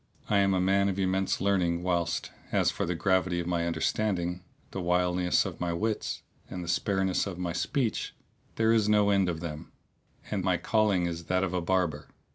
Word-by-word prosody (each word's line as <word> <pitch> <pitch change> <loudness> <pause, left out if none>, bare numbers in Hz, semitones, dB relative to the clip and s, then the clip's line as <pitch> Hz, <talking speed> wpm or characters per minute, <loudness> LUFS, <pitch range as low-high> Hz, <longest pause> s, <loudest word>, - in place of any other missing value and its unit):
I 100 - +5
am 100 -1 +3
a - - +2
man 100 +2 +3
of 95 - -3
immense 95 0 0
learning 90 -3 +1
whilst, 85 -2 -1 0.2
as - - +3
for - - -3
the 85 - -1
gravity 95 0 +1
of 85 - -3
my 85 -1 0
understanding, 90 +1 -1 0.3
the 95 - -4
wiliness 90 0 +2
of - - -6
my 85 -1 0
wits 110 +5 -2 0.3
and 90 - -5
the - - -8
spareness 95 +2 +1
of 95 -3 -5
my 90 -2 -3
speech, 105 - -1 0.4
there 115 0 +3
is 110 -2 +3
no 105 -1 +4
end 95 -2 +3
of 80 -2 -3
them; 75 -3 -6 0.6
and - - -1
my - - +2
calling 105 -5 +2
is 85 -1 -4
that 90 +2 +1
of 90 -1 -1
a 90 - 0
barber. 85 -4 0
90 Hz, 195 wpm, -29 LUFS, 85-100 Hz, 0.6 s, I